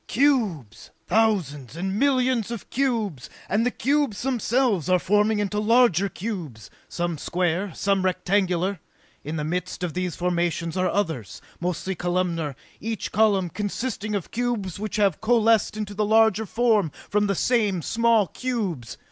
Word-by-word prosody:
"Cubes! 220 - 0 0.2
Thousands 165 - 0
and 190 +4 -2
millions 255 -5 +2
of 235 -3 -7
cubes, 225 - -1 0.2
and 210 +4 +1
the 245 - +2
cubes 275 -4 0
themselves 240 - +1
are 185 - +5
forming 210 +4 +2
into 205 0 -1
larger 215 -4 +4
cubes, 170 - -6 0.2
some 175 -3 -2
square, 180 +3 -1
some 195 -1 +1
rectangular! 185 0 0 0.4
In 150 +3 -4
the 150 - -2
midst 180 +3 -3
of 175 -3 -2
these 180 -1 -2
formations 170 -1 -1
are 185 -1 +1
others, 160 - -2 0.2
mostly 180 +2 -2
columnar, 175 -4 -1 0.2
each 225 -2 -4
column 200 -4 +2
consisting 210 +3 -3
of 195 - -4
cubes 230 -7 -2
which 215 -1 -4
have 200 -6 +2
coalesced 225 -1 +3
into 210 -1 -4
the 210 +1 0
larger 220 0 +3
form 225 -7 +2 0.2
from 210 0 +1
the 200 - 0
same 210 -6 +1
small 230 -2 +3
cubes! 195 - -4
200 Hz, 145 wpm, -24 LUFS, 175-225 Hz, 0.4 s, are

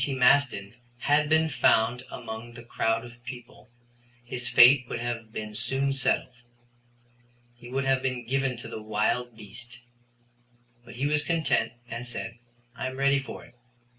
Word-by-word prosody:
T. 140 - -1
Maston 125 -5 +3 0.2
had 145 +4 +2
been 160 0 +4
found 125 -3 +3
among 115 0 -7
the 120 0 -11
crowd 115 0 0
of 120 0 -14
people, 125 0 -10 0.6
his 125 0 -3
fate 125 +2 +7
would - - -3
have 115 -2 -4
been 105 -1 -6
soon 135 +5 0
settled. 135 -1 0 1.2
He 120 0 -13
would 135 +2 -1
have 135 -1 +2
been 130 -2 -2
given 135 0 0
to 115 - -6
the 110 - -7
wild 110 +2 -1
beast. 120 +3 -9 1.0
But 120 - -12
he 130 +4 -1
was 150 0 +2
content 165 -4 +1
and 120 +1 -5
said: 115 -1 -5 0.4
"I - - -3
am 130 0 -6
ready 140 0 +3
for 135 - -8
it." - - -19
125 Hz, 160 wpm, -27 LUFS, 115-135 Hz, 1.2 s, fate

